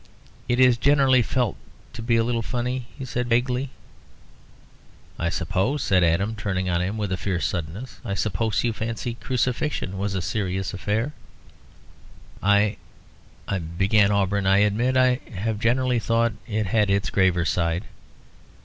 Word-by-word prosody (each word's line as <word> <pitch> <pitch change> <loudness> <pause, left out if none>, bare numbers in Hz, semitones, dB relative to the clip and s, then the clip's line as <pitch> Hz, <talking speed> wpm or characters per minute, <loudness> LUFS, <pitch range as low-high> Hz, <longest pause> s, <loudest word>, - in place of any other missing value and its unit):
"It 120 +1 +1
is 125 -2 +6
generally 135 -1 +4
felt 120 -2 -1 0.4
to - - -7
be 115 +1 +1
a 115 - +3
little 120 0 0
funny," 125 +1 -3
he 135 - -5
said 125 0 -3
vaguely. 125 +3 +1 1.5
"I 85 - 0
suppose," 100 +11 -1
said 95 -2 +3
Adam, 90 +6 +2
turning 100 -3 -2
on 85 -1 +1
him 95 +4 -2
with 105 -3 -2
a 95 - 0
fierce 90 -1 -1
suddenness 90 +9 -4
"I 100 - -3
suppose 110 +2 0
you 120 -2 +1
fancy 115 +2 -4
crucifixion 125 -5 -2
was 100 0 -2
a 95 - -1
serious 95 -1 -2
affair?" 105 +9 -1 1.3
"Well, 100 +1 +4 0.8
I 100 - -1
" 85 +1 -8
began 100 +1 +4
Auberon 100 -1 +1
"I 95 +1 +5
admit 120 +5 +1
I 130 0 +4 0.2
have 105 +3 -2
generally 125 +2 +2
thought 115 0 +1
it 110 -2 -1
had 105 +1 +2
its 100 0 +1
graver 90 -3 +2
side." 85 +2 0
110 Hz, 155 wpm, -24 LUFS, 95-120 Hz, 1.5 s, is